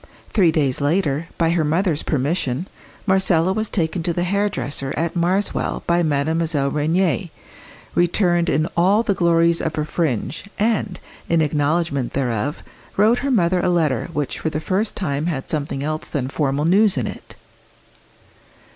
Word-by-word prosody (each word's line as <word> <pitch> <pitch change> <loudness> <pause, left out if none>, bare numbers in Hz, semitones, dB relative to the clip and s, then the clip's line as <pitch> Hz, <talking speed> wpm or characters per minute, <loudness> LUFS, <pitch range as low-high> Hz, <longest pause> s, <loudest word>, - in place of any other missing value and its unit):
Three 185 -6 +4
days 140 -4 0
later, 155 0 0
by 165 -1 +2
her 170 -2 +1
mother's 160 +1 +1
permission, 145 +1 -1 0.4
Marcella 190 -3 +3
was 220 +1 -2
taken 170 -1 -1
to 170 +1 -1
the 175 - -1
hairdresser 175 -9 -1
at 165 +3 -1
Marswell 185 +4 0
by 170 0 +2
Mademoiselle 155 -1 0
Rénier, 170 +4 0 0.6
returned 175 0 +2
in 155 +3 +1
all 195 +6 +3
the 205 - +1
glories 170 -2 +3
of 160 -1 -3
a 150 - 0
"fringe," 150 - -2
and, 210 -3 0 0.3
in 165 - +3
acknowledgment 150 -2 0
thereof, 130 +2 -2 0.3
wrote 220 +4 +4
her 280 - -2
mother 185 -7 +2
a 175 - +1
letter 160 -7 +1
which 145 -3 -3
for 160 - -1
the 155 - -3
first 195 +7 -1
time 150 -4 -2
had 140 -6 -3
something 140 -3 -2
else 155 +1 -3
than 130 -3 -3
formal 140 0 -1
news 195 +1 +4
in 125 - 0
it. - - -8
165 Hz, 155 wpm, -21 LUFS, 145-180 Hz, 0.6 s, Three